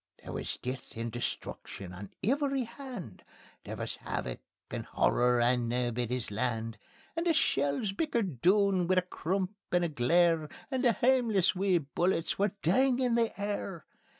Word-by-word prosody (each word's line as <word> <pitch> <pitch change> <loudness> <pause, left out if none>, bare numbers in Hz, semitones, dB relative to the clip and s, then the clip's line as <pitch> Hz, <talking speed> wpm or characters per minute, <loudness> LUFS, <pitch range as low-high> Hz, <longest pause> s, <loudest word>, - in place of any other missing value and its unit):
There - - -7
wis - - -3
death 125 -2 -6
and 115 0 -3
destruction 100 -5 -5
on 95 +2 -8
every 275 +3 +1
hand; 235 - -8 0.4
There - - -6
wis - - -4
havoc 60 -1 -4 0.3
and - - -3
horror 125 0 +2
on 120 0 +2
Naebuddy's 120 -1 -1
Land. 115 0 -2 0.4
And 335 +1 -1
the 335 - +5
shells 145 - +1
bickered 200 - -1
doun 190 -1 +4
wi' 185 - +3
a 185 - +3
crump 185 +2 -2 0.2
and 175 0 +3
a - - -1
glare, 160 +3 +3 0.2
And 260 -1 0
the 240 -3 +5
hameless 235 -6 +3
wee 190 -1 +2
bullets 170 +4 0
were 200 0 +1
dingin' 250 +7 +3
the 230 -3 +1
air. 200 -4 -3
180 Hz, 150 wpm, -31 LUFS, -, 0.4 s, the